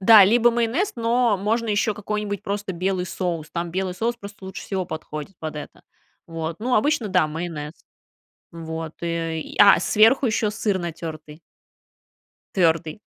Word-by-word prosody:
Да, 205 0 +9
либо 235 +4 +5
майонез, 240 - 0
но 230 -1 +2
можно 225 +4 0
еще 210 +1 +1
какой-нибудь 210 -1 -3
просто 200 -1 -3
белый 185 +1 -1
соус. 170 -6 -3
Там 170 0 -3
белый 185 0 -2
соус 230 +5 -1
просто 200 -2 -11
лучше 190 0 -7
всего 190 -2 -2
подходит 160 +3 -7
под 155 -1 -5
это. 150 - -9 0.4
Вот. 165 0 -4
Ну, 245 +3 0
обычно, 260 -2 +2
да, 180 -4 +3
майонез. 155 -1 -5 0.8
Вот 160 -1 -6
и 165 -1 -3
а, 205 -1 +8
сверху 225 +5 +4
еще 215 -1 +1
сыр 205 -2 -1
натертый. 160 -2 -7 1.2
Твердый. 165 +1 +1
190 Hz, 145 wpm, -23 LUFS, 165-215 Hz, 1.2 s, Да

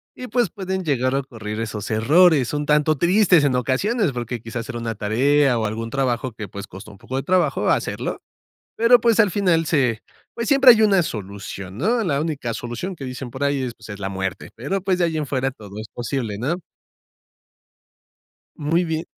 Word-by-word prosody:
y, 250 - -7
pues, 240 +1 +1
pueden 190 -2 -4
llegar 130 -5 0
a 135 - +2
ocurrir 110 -5 -6
esos 110 -2 -4
errores. 145 +5 +4
Son 145 +2 -2
tanto 150 +1 +2
tristes 180 0 +4
en 140 -3 +2
ocasiones 165 - +1
porque 120 -1 -5
quizás 115 +1 -6
era 120 - -5
una 115 -1 -3
tarea 125 +5 +2
o 110 - -1
algún 110 +2 -3
trabajo 130 -2 -1
que, 105 -1 -7
pues, 100 +2 -8
costó 95 +3 -11
un 100 - -15
poco 130 - -7
de 135 - -1
trabajo 180 +2 +1
hacerlo. - - -1 0.6
Pero, 235 +2 +5
pues, 230 -2 +4
al 210 -4 +2
final 180 -5 +2
se, 130 -8 +1 0.3
pues, 230 -1 -3
siempre 275 -3 +8
hay 225 -2 +4
una 200 -4 +4
solución, 100 - -6
¿no? 225 - +1
La 145 -8 0
única 145 -7 -3
solución 120 - -5
que 135 - -6
dicen 125 -1 -6
por 130 +3 -2
ahí 140 -1 0
es, 125 -2 -3
pues, - - -15
es 105 -2 -8
la 95 -1 -3
muerte. 95 -1 -4
Pero, 145 - -3
pues, 190 -2 +1
de 175 - +3
ahí 165 -1 -2
en 150 - -1
fuera, 135 -1 -1
todo 105 -4 -11
es 110 - -7
posible, 120 -3 -4
¿no? 135 +10 -1 2.0
Muy 165 +4 +1
bien. 160 0 -3
135 Hz, 200 wpm, -22 LUFS, 115-175 Hz, 2.0 s, siempre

